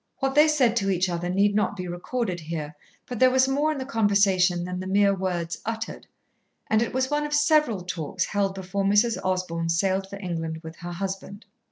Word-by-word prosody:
What 270 Hz, -1 st, -1 dB
they 300 Hz, +2 st, +6 dB
said 265 Hz, -7 st, +3 dB
to 195 Hz, -3 st, +1 dB
each 185 Hz, -1 st, +1 dB
other 175 Hz, 0 st, -3 dB
need 200 Hz, +3 st, +2 dB
not 210 Hz, 0 st, +1 dB
be 180 Hz, -1 st, -5 dB
recorded 180 Hz, +2 st, -3 dB
here, 155 Hz, -2 st, -5 dB, 0.3 s
but 245 Hz, -3 st, -6 dB
there 255 Hz, -, +6 dB
was 260 Hz, +1 st, +3 dB
more 290 Hz, +3 st, +1 dB
in 305 Hz, -, -3 dB
the 260 Hz, -, -4 dB
conversation 200 Hz, -7 st, +2 dB
than 180 Hz, 0 st, -4 dB
the 185 Hz, -, -5 dB
mere 200 Hz, +1 st, +3 dB
words 175 Hz, -3 st, -3 dB
uttered, 225 Hz, 0 st, -5 dB, 0.6 s
and 220 Hz, 0 st, +4 dB
it 235 Hz, -, -1 dB
was 260 Hz, +2 st, -1 dB
one 295 Hz, 0 st, +1 dB
of 295 Hz, 0 st, -1 dB
several 295 Hz, -, +3 dB
talks 175 Hz, -4 st, -3 dB
held 200 Hz, -2 st, -1 dB
before 195 Hz, +1 st, -3 dB
Mrs. 210 Hz, +4 st, +3 dB
Osborn 180 Hz, -3 st, -1 dB
sailed 190 Hz, +3 st, +1 dB
for 200 Hz, -, -7 dB
England 165 Hz, -4 st, -4 dB
with 160 Hz, +1 st, -9 dB
her 175 Hz, 0 st, -7 dB
husband. 195 Hz, +3 st, -5 dB
195 Hz, 205 wpm, -25 LUFS, 180-235 Hz, 0.6 s, they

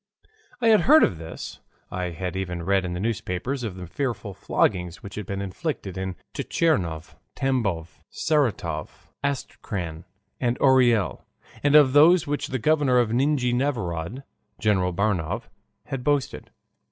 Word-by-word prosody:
I 230 Hz, -, +4 dB
had 215 Hz, -2 st, +6 dB
heard 310 Hz, +3 st, +7 dB
of 85 Hz, -, +1 dB
this, 80 Hz, 0 st, -8 dB, 0.3 s
I 90 Hz, 0 st, -2 dB
had 90 Hz, +1 st, -4 dB
even 90 Hz, -3 st, -3 dB
read 95 Hz, +1 st, +2 dB
in 90 Hz, -, -3 dB
the 90 Hz, -, -3 dB
newspapers 115 Hz, +4 st, -2 dB
of 110 Hz, -6 st, -4 dB
the 90 Hz, -1 st, -7 dB
fearful 115 Hz, -, -3 dB
floggings 90 Hz, +1 st, 0 dB
which 100 Hz, -, -8 dB
had 105 Hz, -3 st, -6 dB
been 100 Hz, 0 st, -3 dB
inflicted 100 Hz, -, -4 dB
in 95 Hz, -1 st, -3 dB, 0.2 s
Tchernigov, 90 Hz, -, 0 dB, 0.2 s
Tambov, 100 Hz, -12 st, -1 dB
Saratov, 145 Hz, -, -1 dB
Astrakhan, 95 Hz, -, -4 dB, 0.3 s
and 120 Hz, -1 st, 0 dB
Orel, 125 Hz, -7 st, +3 dB, 0.4 s
and 145 Hz, +1 st, +3 dB
of 145 Hz, -4 st, +7 dB
those 160 Hz, +4 st, +7 dB
of 150 Hz, -, -9 dB
which 145 Hz, -, -1 dB
the 130 Hz, -, -2 dB
governor 140 Hz, 0 st, +3 dB
of 120 Hz, -3 st, +3 dB
Nijni 130 Hz, -1 st, +2 dB
Novgorod, 120 Hz, -, -2 dB, 0.3 s
General 95 Hz, -5 st, +2 dB
Baranov, 90 Hz, -3 st, -1 dB, 0.4 s
had 135 Hz, -2 st, -5 dB
boasted. 145 Hz, -1 st, -1 dB
110 Hz, 145 wpm, -25 LUFS, 90-135 Hz, 0.4 s, heard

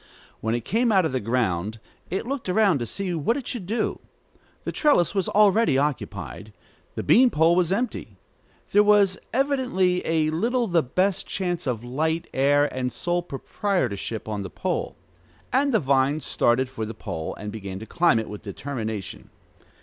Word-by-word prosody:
When 110 Hz, +1 st, -1 dB
it 120 Hz, -, -4 dB
came 235 Hz, +1 st, +2 dB
out 190 Hz, -4 st, +4 dB
of 160 Hz, -, -1 dB
the 130 Hz, -, 0 dB
ground, 110 Hz, -3 st, -1 dB, 0.3 s
it 190 Hz, +5 st, -2 dB
looked 265 Hz, -5 st, -4 dB
around 190 Hz, -5 st, +3 dB
to 120 Hz, -, -3 dB
see 185 Hz, -, -3 dB
what 170 Hz, -, 0 dB
it 270 Hz, -, -6 dB
should 210 Hz, -8 st, -5 dB
do. 225 Hz, +4 st, -1 dB, 0.6 s
The -, -, -3 dB
trellis 285 Hz, -, +3 dB
was 195 Hz, -3 st, 0 dB
already 210 Hz, -7 st, +4 dB
occupied. 135 Hz, -6 st, -3 dB, 0.4 s
The -, -, -3 dB
bean 255 Hz, +1 st, +6 dB
pole 165 Hz, -2 st, +3 dB
was 180 Hz, -1 st, +2 dB
empty. 240 Hz, +6 st, -2 dB, 0.5 s
There 205 Hz, -, +6 dB
was 205 Hz, -2 st, +4 dB
evidently 250 Hz, -10 st, +1 dB
a 160 Hz, -1 st, +1 dB
little 235 Hz, +9 st, +1 dB
the 175 Hz, -5 st, +2 dB
best 185 Hz, +8 st, 0 dB
chance 175 Hz, -5 st, -2 dB
of 120 Hz, -3 st, -2 dB
light, 160 Hz, +7 st, -1 dB
air, 145 Hz, +2 st, +3 dB
and 125 Hz, -1 st, -2 dB
sole 175 Hz, +9 st, -1 dB
proprietorship 135 Hz, -, -2 dB
on 105 Hz, -2 st, -3 dB
the 95 Hz, -, -6 dB
pole. -, -, -3 dB, 0.6 s
And 275 Hz, +2 st, +3 dB
the 220 Hz, -, +3 dB
vine 140 Hz, 0 st, +2 dB
started 130 Hz, -2 st, +1 dB
for 125 Hz, -3 st, -6 dB
the 110 Hz, +1 st, -5 dB
pole, 80 Hz, 0 st, -5 dB
and 105 Hz, +1 st, -6 dB
began 100 Hz, -3 st, -6 dB
to 110 Hz, -, -8 dB
climb 170 Hz, -1 st, +3 dB
it 110 Hz, -, -2 dB
with 105 Hz, -, -8 dB
determination. 110 Hz, -3 st, -5 dB
160 Hz, 170 wpm, -24 LUFS, 120-200 Hz, 0.6 s, bean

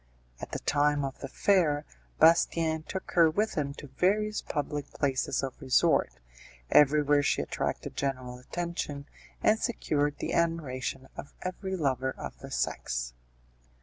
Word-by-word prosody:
At -, -, -7 dB
the -, -, -2 dB
time 145 Hz, 0 st, +2 dB
of 135 Hz, -, -6 dB
the 135 Hz, -, -5 dB
fair, 155 Hz, -2 st, +2 dB, 0.3 s
Bastien 160 Hz, -1 st, +4 dB
took 190 Hz, +4 st, -6 dB
her 165 Hz, -2 st, +6 dB
with 210 Hz, +7 st, 0 dB
him 140 Hz, -4 st, -2 dB
to 150 Hz, -, -9 dB
various 210 Hz, +3 st, +2 dB
public 145 Hz, 0 st, -3 dB
places 135 Hz, -1 st, -1 dB
of 135 Hz, +2 st, -5 dB
resort; 130 Hz, -, +3 dB, 0.6 s
everywhere 145 Hz, 0 st, +5 dB
she 145 Hz, -, +1 dB
attracted -, -, -3 dB
general 130 Hz, -3 st, -3 dB
attention, 150 Hz, -1 st, -4 dB, 0.4 s
and 215 Hz, +1 st, +4 dB
secured 145 Hz, -, 0 dB
the -, -, -3 dB
admiration 135 Hz, -6 st, -1 dB
of -, -, -9 dB
every 190 Hz, +1 st, -3 dB
lover 130 Hz, -5 st, 0 dB
of -, -, -7 dB
the -, -, -9 dB
sex. -, -, -2 dB
145 Hz, 140 wpm, -29 LUFS, 135-170 Hz, 0.6 s, her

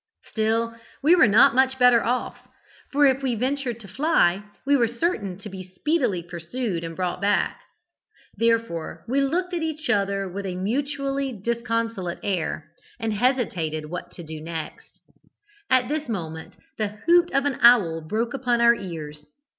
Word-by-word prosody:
"Still 225 Hz, +1 st, 0 dB, 0.3 s
we 315 Hz, +4 st, +6 dB
were 320 Hz, -9 st, +6 dB
not 225 Hz, +7 st, +6 dB
much 265 Hz, +1 st, +3 dB
better 250 Hz, -2 st, +5 dB
off, 245 Hz, +2 st, -2 dB, 0.4 s
for 285 Hz, +1 st, +4 dB
if 270 Hz, 0 st, +3 dB
we 260 Hz, -3 st, 0 dB
ventured 255 Hz, 0 st, -2 dB
to 200 Hz, -, -11 dB
fly, 205 Hz, -, +2 dB, 0.2 s
we 285 Hz, +1 st, +4 dB
were 240 Hz, -4 st, +3 dB
certain 225 Hz, -, -2 dB
to 200 Hz, -, -10 dB
be 190 Hz, -2 st, -7 dB
speedily 245 Hz, -, 0 dB
pursued 175 Hz, +3 st, -4 dB
and 165 Hz, 0 st, -6 dB
brought 180 Hz, 0 st, -2 dB
back. 205 Hz, 0 st, +1 dB, 0.7 s
Therefore 230 Hz, -8 st, -1 dB
we 270 Hz, +4 st, +1 dB
looked 360 Hz, +6 st, -1 dB
at 345 Hz, -, -1 dB
each 310 Hz, -1 st, -2 dB
other 200 Hz, -1 st, 0 dB
with 195 Hz, +2 st, -5 dB
a 180 Hz, -, -4 dB
mutually 275 Hz, +6 st, -2 dB
disconsolate 230 Hz, -4 st, -2 dB
air, 170 Hz, -5 st, -2 dB, 0.3 s
and 225 Hz, -1 st, -1 dB
hesitated 180 Hz, -, -1 dB
what 180 Hz, -, -5 dB
to 175 Hz, -, -9 dB
do 155 Hz, -1 st, -8 dB
next. 160 Hz, 0 st, -7 dB, 0.7 s
At 255 Hz, -1 st, +3 dB
this 300 Hz, -1 st, -3 dB
moment 160 Hz, -6 st, -5 dB, 0.2 s
the 215 Hz, -, +1 dB, 0.2 s
hoot 345 Hz, 0 st, +5 dB
of 275 Hz, +1 st, +1 dB
an 285 Hz, -2 st, -1 dB
owl 200 Hz, -10 st, +6 dB
broke 220 Hz, +9 st, -2 dB
upon 245 Hz, -3 st, 0 dB
our 235 Hz, 0 st, +6 dB
ears. 155 Hz, -8 st, -7 dB
230 Hz, 160 wpm, -24 LUFS, 185-265 Hz, 0.7 s, we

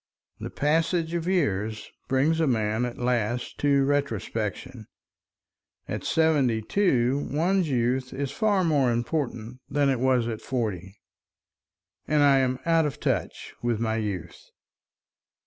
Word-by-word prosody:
The -, -, -5 dB
passage 165 Hz, +3 st, 0 dB
of 170 Hz, 0 st, -2 dB
years 110 Hz, -, -1 dB, 0.2 s
brings 140 Hz, +5 st, +2 dB
a 160 Hz, -, +2 dB
man 110 Hz, -1 st, 0 dB
at 120 Hz, -, -6 dB
last 120 Hz, -1 st, -1 dB
to 140 Hz, -1 st, +3 dB
retrospection; 115 Hz, -5 st, -2 dB, 1.0 s
at -, -, -4 dB
seventy 145 Hz, -8 st, +2 dB
two 135 Hz, -, +1 dB
one's 175 Hz, +3 st, +1 dB
youth 125 Hz, 0 st, 0 dB
is 135 Hz, 0 st, -3 dB
far 205 Hz, +3 st, +1 dB
more 145 Hz, -7 st, +2 dB
important 120 Hz, -1 st, -3 dB
than 140 Hz, 0 st, +2 dB
it 130 Hz, -3 st, 0 dB
was 130 Hz, -2 st, +2 dB
at 110 Hz, -2 st, -4 dB
forty. 100 Hz, -6 st, -3 dB, 1.1 s
And 150 Hz, -1 st, +3 dB
I 140 Hz, -1 st, +5 dB
am 130 Hz, -1 st, +1 dB
out 165 Hz, -2 st, +3 dB
of 140 Hz, -, -6 dB
touch -, -, -2 dB
with 120 Hz, -2 st, 0 dB
my 110 Hz, -1 st, -1 dB
youth. 100 Hz, -6 st, -4 dB
130 Hz, 130 wpm, -26 LUFS, 115-150 Hz, 1.1 s, I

